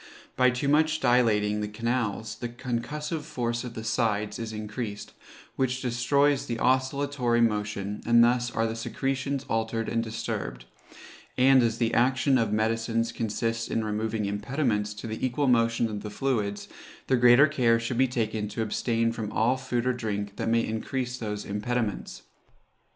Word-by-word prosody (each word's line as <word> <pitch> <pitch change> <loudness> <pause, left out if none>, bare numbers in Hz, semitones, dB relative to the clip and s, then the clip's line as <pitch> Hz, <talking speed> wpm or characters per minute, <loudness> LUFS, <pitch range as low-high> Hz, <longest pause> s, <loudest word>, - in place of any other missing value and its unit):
By 125 0 +5
too 125 +3 -2
much 155 +2 +3
dilating 110 -5 +2
the 105 - -2
canals, 110 -1 -2
the 120 - -4
concussive 145 +6 -4
force 120 -5 -3
of 125 -2 -7
the 110 - -5
sides 105 -2 0
is 115 -1 -4
increased, 105 0 -5 0.4
which 130 -1 0
destroys 135 +3 +1
the 115 - -2
oscillatory 130 -1 +1
motion, 105 -2 -1
and 115 0 +5
thus 120 0 +2
are 115 -1 0
the 115 0 -2
secretions 135 +3 -2
altered 115 0 -1
and 115 - 0
disturbed; - - -4 0.7
and 130 +1 +6
as 115 -1 +1
the 115 -1 0
action 130 +2 +3
of 110 -3 0
medicines 115 +1 0
consists 115 +1 -2
in 115 - -1
removing 110 0 -2
impediments 105 0 -1
to 105 - -8
the 110 -1 -5
equal 130 +3 0
motion 115 -2 +3
of 105 -2 -5
the 105 - -6
fluids, 105 -4 -2 0.4
the 130 - +2
greater 125 +3 +7
care 125 -6 +2
should 115 +1 -3
be 130 - +5
taken 110 -3 -2
to 110 +2 -3
abstain 115 +1 0
from 110 -2 -5
all 120 +4 +2
food 130 -2 -2
or 130 - +2
drink 105 -4 -4
that - - -1
may 115 0 +2
increase 125 +3 -3
those 105 -2 -4
impediments. 105 0 -3
115 Hz, 160 wpm, -27 LUFS, 110-125 Hz, 0.7 s, greater